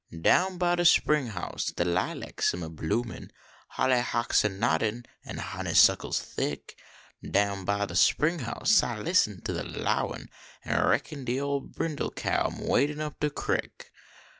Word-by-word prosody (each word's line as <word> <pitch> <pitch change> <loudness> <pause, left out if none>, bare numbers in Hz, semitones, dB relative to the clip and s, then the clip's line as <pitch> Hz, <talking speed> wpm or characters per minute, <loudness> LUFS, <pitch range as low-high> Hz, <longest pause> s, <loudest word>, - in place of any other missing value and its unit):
Down 185 - +3
by 175 0 +1
de 175 - +1
spring 150 -5 +4
house 95 -6 -4
de 85 - -1
lilacs 90 0 -1
am 90 - -5
a 80 - -6
bloomiif; 110 +9 -3 0.4
Holly 130 -1 +1
hocks 120 -1 +1
a 105 - +2
noddin 110 +4 -1 0.2
an - - -7
honey - - -4
suckles - - +5
thick. 70 - -5 0.5
Down 100 -1 0
by 100 +1 0
de 85 - -8
spring 155 - +3
house 130 - +2
I 120 -2 -3
listen 105 - +1
to - - -3
de - - -3
lowin; - - -3 0.3
An - - +1
reckon 145 -3 0
de 125 +1 -1
ole 140 0 -1
brindle 155 0 -3
cow - - -1
am - - -7
wadin 145 +3 +1
up 150 -1 -5
de 150 - +1
creek. 145 - -4
120 Hz, 165 wpm, -28 LUFS, 100-150 Hz, 0.5 s, suckles